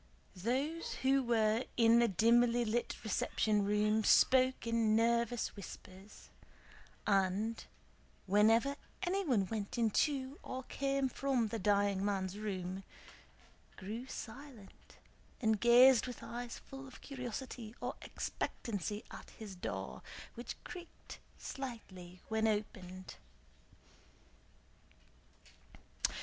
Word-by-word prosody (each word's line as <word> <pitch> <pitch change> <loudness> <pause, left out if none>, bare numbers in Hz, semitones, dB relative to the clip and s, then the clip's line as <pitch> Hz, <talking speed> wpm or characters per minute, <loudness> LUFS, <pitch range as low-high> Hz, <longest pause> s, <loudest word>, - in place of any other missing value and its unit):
Those 265 - -1
who 270 +1 +4
were 225 -1 +2
in 230 0 +6
the 235 - +5
dimly 235 +4 +4
lit 235 +2 -1
reception 215 -1 +1
room 210 +2 +2
spoke 255 +2 +5
in 230 -2 +2
nervous 235 +1 +1
whispers, 195 0 -11 0.7
and, 200 +3 +1 0.6
whenever 225 +8 +4 0.3
anyone 345 - +1
went 215 +4 -4
into 260 +4 +1
or 260 0 -5
came 275 +1 0
from 255 -3 0
the 225 - -3
dying 200 -1 +2
man's 195 -2 -1
room, 190 -2 -4 0.9
grew 220 +6 -6
silent 240 -4 -10 0.4
and 220 -4 +2
gazed 245 +1 +7
with 250 - -7
eyes 240 0 -5
full 270 0 -10
of 260 - -13
curiosity 250 -3 -6
or - - -3
expectancy 210 -1 -4
at - - -10
his 215 -3 -8
door, 180 - -5 0.3
which 240 +1 -6
creaked 350 -1 -10 0.2
slightly 190 -9 -7
when 220 0 +1
opened. 190 -3 -3
225 Hz, 100 wpm, -35 LUFS, 205-255 Hz, 0.9 s, gazed